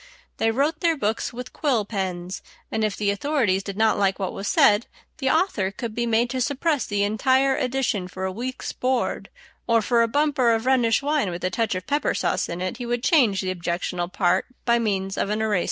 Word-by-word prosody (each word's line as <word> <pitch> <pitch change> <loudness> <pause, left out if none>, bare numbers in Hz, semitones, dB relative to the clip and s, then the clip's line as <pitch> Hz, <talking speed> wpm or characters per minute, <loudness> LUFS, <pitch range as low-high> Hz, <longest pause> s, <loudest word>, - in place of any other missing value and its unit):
They 225 - +2
wrote 285 +7 0
their 330 -2 +2
books 220 -4 -1
with 250 +1 -8
quill 250 -9 0
pens, 185 -3 -4 0.3
and 220 - -1
if 215 -2 -1
the 205 -1 +1
authorities 205 -4 +1
did 200 0 -7
not 220 -1 +3
like 195 -1 +2
what 190 -2 -3
was 195 - -5
said, 210 +2 +4 0.3
the 265 -2 +1
author 315 - +1
could 230 +2 -6
be 240 +1 -1
made 230 +1 +2
to 260 -1 -2
suppress 285 +1 0
the 205 0 0
entire 260 +6 +2
edition 250 -7 -1
for 185 +1 -5
a 190 - -2
week's 250 +6 -5
board, 255 -1 -1 0.4
or 230 -1 +4
for 235 +2 +2
a 230 - +3
bumper 265 -3 +2
of 225 +1 -3
Rhenish 255 -2 +3
wine 290 -8 +1
with 175 0 -6
a 185 - 0
touch 220 +1 0
of 185 0 -4
pepper 290 +2 0
sauce - - 0
in 170 +1 -4
it 185 +6 -3
he 245 - -5
would 240 0 -2
change 245 - +3
the 185 -1 -2
objectionable 175 0 -2
part 185 -1 +1 0.2
by 235 -1 +3
means 195 -4 -1
of - - 0
an 210 +1 -1
eraser. 215 -4 +1
225 Hz, 220 wpm, -24 LUFS, 195-260 Hz, 0.4 s, said